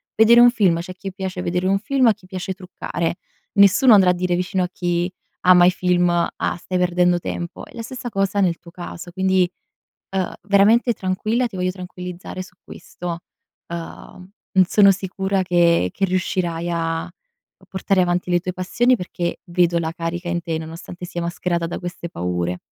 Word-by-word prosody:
vedere 230 +2 +6
un 240 0 +9
film, 190 -8 +2
c'è 175 +2 -6
a - - -10
chi 195 0 -7
piace 190 -1 -4
vedere 180 +1 -1
un 195 +1 +2
film, 265 +3 +2
a 225 - +6
chi 205 -2 -21
piace 185 0 -5
truccare. 175 -2 -4 0.4
Nessuno 200 +5 +6
andrà 190 -3 +6
a - - +1
dire 180 0 0
vicino 180 +1 -1
a 180 - -2
chi 175 0 -1 0.3
ama 180 -1 +6
i 180 - +6
film: 180 -1 +1
"Ah, 170 0 -1
stai 185 +1 -3
perdendo 180 0 +2
tempo." 170 0 -6
È - - -18
la 230 - -5
stessa 250 +1 -6
cosa 195 0 0
nel 175 -3 +2
tuo 170 - -15
caso, 175 0 -8
quindi, 190 -1 +2 0.6
uhm, 190 -1 -1
veramente 210 +5 +4
tranquilla, 215 +6 -1
ti 220 - -9
voglio 180 0 0
tranquillizzare 180 0 -7
su 185 - -15
questo. 170 -1 -7 0.5
Mhmm, 170 +2 -9 0.4
sono 200 +1 +6
sicura 190 0 -1
che 170 - +3
che 195 - -1
riuscirai 175 -2 -1
a 165 0 -2 0.6
portare 190 0 0
avanti 180 0 -1
le 175 - +3
tue 185 +1 -4
passioni, 240 +8 +2
perché 175 -2 -4
vedo 175 -1 +2
la 160 -1 -2
carica 170 0 -4
in 175 0 -1
te, 165 -1 -2
nonostante 165 +2 -8
sia 175 -1 -5
mascherata 170 0 -2
da 170 - -5
queste 175 -1 -6
paure. 90 - -2
180 Hz, 180 wpm, -21 LUFS, 175-190 Hz, 0.6 s, un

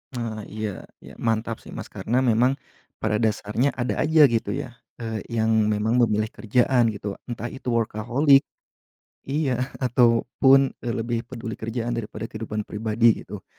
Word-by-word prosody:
Nah, 110 -3 -4
iya 110 0 -3 0.4
iya - - -11
mantap 115 0 -1
sih - - -14
Mas, - - -6
karena 120 +3 -2
memang 125 +3 +3 0.4
pada 105 +1 0
dasarnya 110 +4 +1
ada 125 0 -1
aja 155 -1 +6
gitu 115 -4 0
ya, 120 - -4 0.2
eee, 110 -3 -4 0.2
yang 110 -1 +3
memang 110 +4 +2
memilih 110 -1 +1
kerjaan 120 +2 +2
gitu 100 -1 -5 0.2
entah 120 -1 -4
itu 130 - -6
workaholic. 120 +5 +3 0.8
Iya, 140 0 -1
ah 130 - -1 0.2
ataupun, 125 +3 +4
eee, 120 - -2
lebih 115 0 -2
peduli 115 -3 -6
kerjaan 115 +1 -3
daripada 110 -1 -5
kehidupan 110 -1 -5
pribadi 110 +1 +2
gitu. 100 0 -9
115 Hz, 150 wpm, -24 LUFS, 110-125 Hz, 0.8 s, aja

